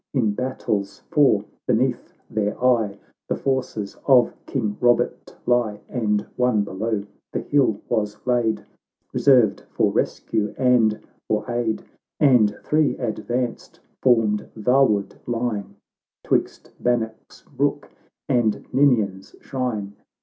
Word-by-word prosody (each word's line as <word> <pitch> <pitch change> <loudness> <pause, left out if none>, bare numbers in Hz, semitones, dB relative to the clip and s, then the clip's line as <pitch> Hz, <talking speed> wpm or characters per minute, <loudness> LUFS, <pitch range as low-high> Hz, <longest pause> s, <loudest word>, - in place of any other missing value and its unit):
In 115 -6 +2
battles 105 -4 -3
four 130 -9 +4 0.2
beneath - - 0 0.2
their 105 -1 -2
eye, 115 -5 +2 0.3
The - - +1
forces 130 -7 -2
of 130 -3 +5
King 110 -7 -2
Bobert 120 0 +1
lie." 120 -4 +1
And 105 -4 0 0.2
one 125 -4 +2
below 100 +1 -2 0.3
the - - -2
hill 135 -8 +2
was 105 -3 -1
laid, 120 -3 +1 0.5
Reserved 125 -7 +4
for - - +1
rescue 105 -1 -1
and 120 -4 +3 0.3
for 105 0 -1
aid; 120 -2 -1 0.4
And 120 -8 +4
three, 150 -1 +2
advanced, 120 +1 -3 0.2
formed 115 -5 +2
vaward 110 -3 +2
line, 115 -4 -2 0.5
Twixt - - -1
Bannock's 115 -2 -2
brook - - -2 0.4
and 115 -4 +1
Ninian's 110 -9 +2
shrine. 115 -7 -3
115 Hz, 110 wpm, -23 LUFS, 105-125 Hz, 0.5 s, of